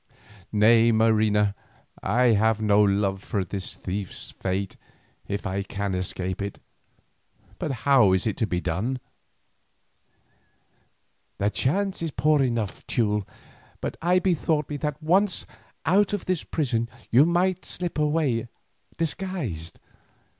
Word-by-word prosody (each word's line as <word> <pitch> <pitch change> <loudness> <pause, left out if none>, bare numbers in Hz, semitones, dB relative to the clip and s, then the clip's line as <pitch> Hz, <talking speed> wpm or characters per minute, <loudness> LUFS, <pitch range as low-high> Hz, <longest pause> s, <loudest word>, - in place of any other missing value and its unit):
"Nay, 115 +2 +5
Marina, 110 -2 +3 0.5
I 120 +5 +3
have 110 +1 +2
no 105 -1 +4
love 100 -1 +1
for 100 -3 -2
this 95 +2 -5
thief's 95 0 -4
fate 95 +1 -3 0.5
if 100 0 -3
I 95 +1 -1
can 100 0 -3
escape 90 0 -3
it, 100 0 -5 1.0
but - - -2 0.2
how 130 -9 +6
is 95 - +1
it 110 - 0
to 110 - 0
be 90 -3 -1
done?" 100 +10 -2 2.4
"The 100 +1 +1
chance 195 - 0
is 165 - -1
poor 150 0 +2
enough, 115 -6 -1
Teule, 105 -4 0 0.5
but - - -4
I 175 +2 +3
bethought 160 -5 +1
me 145 - -2
that 150 +1 -4
once 185 +4 +3 0.4
out 200 +4 +3
of 205 - -2
this 185 -3 -1
prison 120 -7 -1 0.2
you 125 +5 +7
might 180 +2 +1
slip 175 -4 -3
away 150 -7 +1 0.5
disguised. 155 - -3
115 Hz, 125 wpm, -25 LUFS, 100-155 Hz, 2.4 s, you